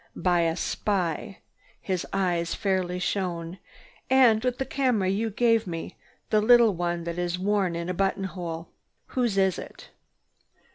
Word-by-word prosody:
"By 180 -1 +2
a 165 - -2
spy!" 195 0 -2 0.4
His 185 -3 -3
eyes 175 -3 0
fairly 185 -3 -1
shone. 180 -2 -3 0.5
"And 245 -4 +5
with 250 -1 0
the 265 - -2
camera 250 -7 +1
you 215 +4 0
gave 230 0 +2
me, 165 -2 -5 0.4
the 215 - +4
little 235 -1 +6
one 175 -1 -2
that 170 +1 -4
is 175 0 -1
worn 190 -2 0
in 170 0 -4
a 180 - -1
button 195 +1 0
hole. 175 -3 -5 0.4
Whose 240 -6 0
is 190 -2 +2
it?" - - -11
190 Hz, 150 wpm, -26 LUFS, 175-215 Hz, 0.5 s, little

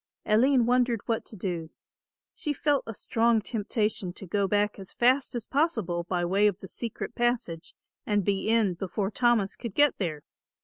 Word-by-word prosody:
Aline 245 +3 +4
wondered 245 -2 +2
what 225 -1 -1
to - - -10
do. 175 -4 -4 0.6
She 300 -4 -2
felt 290 0 +1
a 225 - -4
strong 230 +2 +2
temptation 210 -3 -2
to 195 - -8
go 200 +2 0
back 205 +1 +1
as 190 -1 -9
fast 255 +2 +2
as 235 -2 -3
possible 225 - 0
by 175 -1 -1
way 195 +4 +3
of 200 -4 0
the 195 - -10
secret 230 +3 -6
passage 240 -10 -1 0.3
and 205 -3 0
be 200 +1 0
in 225 -5 +3
before 195 +3 -3
Thomas 235 -4 +2
could 230 -5 -7
get 290 -2 +3
there. 155 -6 -3
210 Hz, 175 wpm, -27 LUFS, 190-240 Hz, 0.6 s, Aline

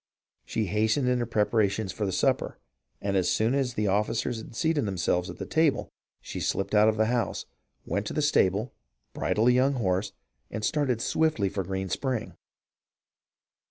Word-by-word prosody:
She 110 - -1
hastened 110 +7 +1
her 120 - 0
preparations 105 -2 +1
for 105 +1 -2
the - - -1
supper, - - 0 0.4
and 100 -1 -1
as 95 -2 +2
soon 110 +3 +2
as 130 -3 0
the 105 - 0
officers 110 +3 0
seated 155 0 0
themselves 90 -1 0
at - - -8
the - - -5
table, 160 -2 +1 0.3
she - - -6
slipped 95 - -1
out 105 +1 +6
of 110 - -1
the 110 - +3
house, 120 +1 -1 0.4
went 100 +1 -2
to - - -4
the 150 - 0
stable, 105 -5 +2 0.4
bridled 110 +3 +2
a - - +6
young 130 +3 +3
horse, 100 -5 0 0.4
and 105 -1 -3
started 130 -5 0
swiftly 155 -12 +1
for 95 0 -3
Green 95 +1 -3
Spring. 115 -1 -2
110 Hz, 165 wpm, -27 LUFS, 100-125 Hz, 0.4 s, out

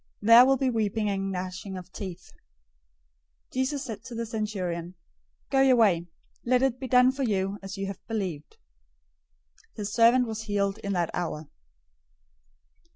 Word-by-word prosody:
There 230 +4 +8
will 270 0 +4
be 260 0 +1
weeping 215 -2 0
and 195 0 -2
gnashing 185 +1 -5
of 180 0 -10
teeth." 185 -4 -8 1.2
008:013 - - -25
Jesus 265 +2 -1
said 220 -4 -7
to 240 - -8
the 230 0 -3
centurion, 185 -6 -4 0.6
"Go 270 - +4
your 265 -1 +5
way. 185 -7 +3 0.4
Let 250 +1 +2
it 260 -2 +1
be 260 - -5
done 250 +1 +5
for 275 +1 -6
you 200 -4 -1
as 195 0 -7
you 195 - -3
have 195 0 -6
believed." 185 -9 -4 1.2
His 210 -1 -5
servant 240 +2 +5
was 220 -1 -5
healed 200 -1 -1
in 200 -2 -3
that 175 -3 0
hour. 160 -3 -4
210 Hz, 155 wpm, -27 LUFS, 190-240 Hz, 1.2 s, There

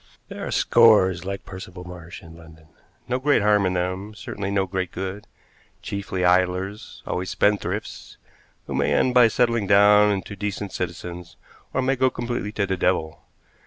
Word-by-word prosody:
There - - -6
are - - -4
scores 95 -6 +4
like 100 0 -5
Percival 95 -1 -9
Marsh 90 -1 -10
in 80 0 -13
London; 80 -1 -16 0.4
no 125 +1 -1
great 140 -5 +2
harm 105 -2 +3
in 90 - -1
them, 95 +4 -3
certainly 100 -2 -5
no 100 -1 +1
great 95 -1 -3
good; 95 +2 -6 0.6
chiefly 100 -2 -3
idlers, 90 +3 0
always 90 +1 -3
spendthrifts, 105 0 -2 0.5
who - - -6
may - - +1
end 130 - +2
by 125 -2 +7
settling 115 -2 +1
down 105 +1 +6
into 100 0 -4
decent 100 0 -4
citizens 85 -3 -6 0.3
or 130 - -1
may 135 +1 +1
go 130 0 +2
completely 120 -4 -4
to 100 - 0
the 95 -1 -2
devil. 85 -3 -1
95 Hz, 160 wpm, -23 LUFS, 90-105 Hz, 0.6 s, by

